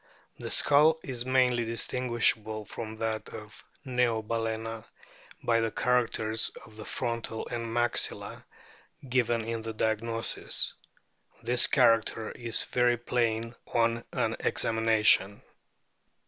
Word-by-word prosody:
(Fig. - - -36
21.) - - -7
The - - -4
skull 155 +3 +4
is 125 -2 -4
mainly 125 -2 +3
distinguishable 115 -2 0
from 110 0 -7
that 110 0 -3
of 105 0 -11 0.2
Neobalcena 115 -2 -1 0.6
by 115 -1 +2
the 115 0 0
characters 115 -2 +1 0.2
of 110 - -16
the 110 -1 -9
frontal 115 -2 -3
and 115 -1 -4
maxilla 120 +1 -1 0.6
given 120 -2 +1
in 115 0 -3
the 115 0 -5
diagnosis; 110 0 -1 0.7
this 125 +1 +3
character 115 -3 +2
is 115 -2 +3
very 120 -1 +2
plain 115 -1 -1
on 115 0 +1
an - - -1
examination. 110 -3 +2
115 Hz, 115 wpm, -29 LUFS, 110-120 Hz, 0.7 s, skull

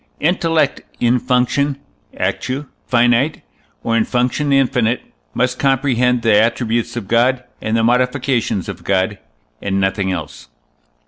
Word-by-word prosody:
Intellect, 165 -2 +1 0.2
in 120 +1 +3
function 130 +3 +1 0.4
(actu) 130 +3 -2 0.2
finite, 120 +4 +2 0.4
or 115 - 0
in 115 - +3
function 125 +5 0
infinite, 125 -3 +2 0.3
must 125 +1 0
comprehend 125 -4 +2
the 110 -2 +5
attributes 115 0 0
of 105 -5 -5
God 125 +3 +2 0.2
and 110 +1 0
the 115 - +1
modifications 125 -4 +1
of 90 -3 -7
God, 95 +1 0 0.4
and 100 -1 -1
nothing 95 0 0
else. 80 -5 -6
120 Hz, 125 wpm, -18 LUFS, 110-130 Hz, 0.4 s, the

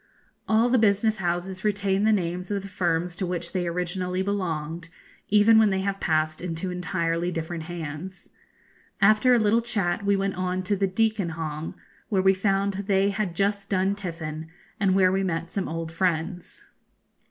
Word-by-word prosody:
All 220 +2 +4
the 250 0 +3
business 215 +1 +3
houses 185 +1 -2
retain 200 -1 +1
the 220 - +4
names 180 -2 -1
of 200 -1 -2
the - - -7
firms 175 -2 -1
to 195 - -1
which 175 -1 -4
they 180 -2 -1
originally 180 +2 -2
belonged, 165 -4 -3 0.4
even 210 +2 +6
when 220 -1 +5
they 190 -1 0
have 195 0 -2
passed 155 -1 0
into 175 +1 -3
entirely 175 -1 -1
different 165 -1 -4
hands. 170 +2 -7 0.7
After 215 +5 +5
a - - +5
little 220 +1 +3
chat 205 -6 -1
we 200 0 +3
went 195 0 -1
on 185 +1 -2
to 200 +2 0
the 195 0 +1
Deacon 215 -1 0
Hong, 160 -1 -5 0.3
where 190 -3 +1
we 190 0 +6
found 195 +1 +1
they 195 0 +1
had 200 -4 -2
just 200 +1 0
done 190 0 +1
tiffin, 165 -5 -5 0.3
and 195 -2 +2
where 185 -1 +5
we 190 +1 +1
met 170 -3 -2
some 195 - -2
old 165 0 -4
friends. 175 +1 -2
185 Hz, 175 wpm, -25 LUFS, 170-200 Hz, 0.7 s, even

